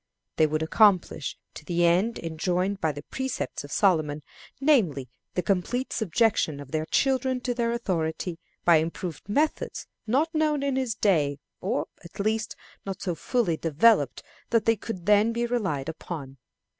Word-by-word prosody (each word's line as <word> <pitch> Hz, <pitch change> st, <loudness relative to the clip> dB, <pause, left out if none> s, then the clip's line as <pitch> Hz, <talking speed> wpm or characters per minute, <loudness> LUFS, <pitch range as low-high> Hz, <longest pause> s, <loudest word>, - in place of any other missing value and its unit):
They 155 Hz, -, +5 dB
would 155 Hz, +1 st, -1 dB
accomplish 180 Hz, -4 st, +3 dB, 0.3 s
the 175 Hz, +2 st, +1 dB
end 185 Hz, +7 st, +3 dB
enjoined 180 Hz, +4 st, -1 dB
by 160 Hz, -, +2 dB
the 145 Hz, 0 st, -8 dB
precepts 265 Hz, -, -4 dB
of 145 Hz, -, -10 dB
Solomon, 155 Hz, -7 st, +2 dB, 0.4 s
namely, 190 Hz, -, +2 dB, 0.3 s
the 180 Hz, -, 0 dB
complete 225 Hz, +7 st, -1 dB
subjection 215 Hz, -7 st, +1 dB
of 140 Hz, -2 st, -10 dB
their 155 Hz, 0 st, -1 dB
children 260 Hz, -1 st, +1 dB
to 245 Hz, -1 st, -1 dB
their 235 Hz, -1 st, 0 dB
authority, 175 Hz, -6 st, -2 dB, 0.3 s
by 170 Hz, -2 st, +7 dB
improved 165 Hz, +2 st, -4 dB
methods 295 Hz, +8 st, 0 dB, 0.2 s
not 295 Hz, +9 st, +1 dB
known 305 Hz, -2 st, +1 dB
in 280 Hz, -2 st, 0 dB
his 255 Hz, -4 st, -1 dB
day, 155 Hz, -10 st, +2 dB, 0.2 s
or, -, -, -1 dB, 0.2 s
at 170 Hz, -, -13 dB
least, 215 Hz, +2 st, -1 dB, 0.3 s
not 195 Hz, -1 st, -5 dB
so 180 Hz, -, -2 dB
fully 190 Hz, -2 st, 0 dB
developed 160 Hz, -, +3 dB, 0.3 s
that 230 Hz, -2 st, +2 dB
they 225 Hz, -, +4 dB
could 195 Hz, -4 st, -7 dB
then 210 Hz, +3 st, +4 dB
be 235 Hz, +1 st, 0 dB
relied 190 Hz, -, -1 dB
upon. 150 Hz, -4 st, -7 dB
190 Hz, 155 wpm, -26 LUFS, 160-235 Hz, 0.4 s, by